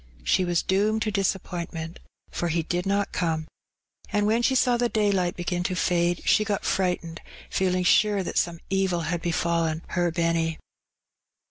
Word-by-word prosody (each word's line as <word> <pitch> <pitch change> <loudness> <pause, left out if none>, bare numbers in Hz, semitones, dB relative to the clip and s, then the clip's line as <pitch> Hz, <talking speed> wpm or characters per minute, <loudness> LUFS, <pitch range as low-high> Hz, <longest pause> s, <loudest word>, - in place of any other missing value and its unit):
she 185 - +2
was 175 -1 +1
doomed 210 +3 +1
to 220 -1 -1
disappointment, 175 -4 -3 0.3
for 175 - -2
he 165 0 0
did 175 +3 -2
not 200 0 0
come; 160 -3 -1 0.6
and 205 0 +1
when 225 +3 +2
she 265 +2 +2
saw 250 -1 +3
the 240 0 +1
daylight 200 -5 +1
begin 175 0 -2
to 180 +1 -1
fade, 175 -1 +1
she 215 - +4
got 205 -2 -2
frightened, 180 -3 -1 0.3
feeling 185 -1 +1
sure 205 +2 +3
that - - -5
some 170 -1 -2
evil 190 -3 +1
had 170 +1 -2
befallen 170 -1 0
"her 175 -1 +1
Benny." 165 -1 0
180 Hz, 160 wpm, -25 LUFS, 170-200 Hz, 0.6 s, she